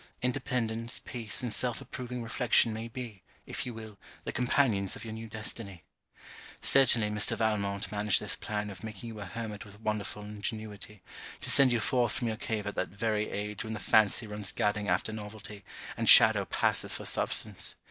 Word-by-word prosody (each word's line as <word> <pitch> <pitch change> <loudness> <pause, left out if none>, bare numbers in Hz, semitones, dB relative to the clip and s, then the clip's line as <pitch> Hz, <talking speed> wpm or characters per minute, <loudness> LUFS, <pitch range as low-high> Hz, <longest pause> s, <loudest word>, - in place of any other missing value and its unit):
Independence, 120 -3 -1
peace, 115 -1 -1
and 120 -3 0
self 125 -2 +1
approving 125 -1 -6
reflection 115 0 +2
may 110 +1 -5
be, 115 -4 -8 0.2
if 135 - -5
you 125 - -5
will, 110 -2 -10 0.2
the - - -4
companions 120 -6 +1
of - - -8
your 110 - -6
new 110 +1 -7
destiny. 105 -5 -5 0.8
Certainly 120 -6 +5
Mr. 105 -1 +1
Valmont 100 -3 -1
managed 105 -1 +2
his - - -3
plan 105 -1 -4
of 95 -2 -12
making 110 +1 -7
you 110 -2 -8
a 100 - -6
Hermit 105 +2 -6
with 100 0 -14
wonderful 105 -1 -3
ingenuity, 105 -1 -7 0.4
to - - 0
send 135 -2 +6
you 120 - +2
forth 120 0 +1
from 120 - -2
your 110 -1 -2
cave 110 -3 -3
at 105 - -3
that 95 - -2
very 105 +1 -1
age 105 0 -4
when 110 -1 -5
the 110 - -5
fancy 110 +2 +3
runs 105 -2 -3
gadding 105 0 -1
after 90 +4 0
novelty, 105 -1 -8 0.3
and - - +1
shadow - - +9
passes - - 0
for - - -6
substance. - - 0
110 Hz, 180 wpm, -30 LUFS, 105-115 Hz, 0.8 s, shadow